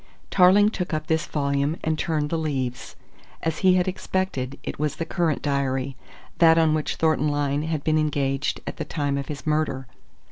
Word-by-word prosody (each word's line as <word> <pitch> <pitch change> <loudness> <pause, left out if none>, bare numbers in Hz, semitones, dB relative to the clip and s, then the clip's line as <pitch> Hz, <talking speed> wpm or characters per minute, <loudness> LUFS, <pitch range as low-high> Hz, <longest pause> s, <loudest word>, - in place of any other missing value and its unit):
Tarling 200 +3 +6
took 180 -6 -3
up 155 0 -3
this 160 0 0
volume 140 +1 0
and 160 0 +1
turned 155 -2 -1
the 165 - +1
leaves. 130 -5 -3 0.5
As 160 -1 -1
he 185 -2 +5
had 180 0 +2
expected, 185 -8 -2
it - - -6
was 150 -1 -1
the 165 - -3
current 165 -3 -1
diary 135 -2 -1 0.4
that 165 -1 +6
on 160 -1 +4
which 155 -1 -1
Thornton 155 -2 +2
Lyne 145 -1 0
had 155 -2 -2
been 155 0 +2
engaged 140 -2 -1
at - - -6
the - - -3
time 145 -3 -2
of 140 -1 -3
his 145 -2 -7
murder. 150 -4 0
155 Hz, 185 wpm, -24 LUFS, 140-160 Hz, 0.5 s, Tarling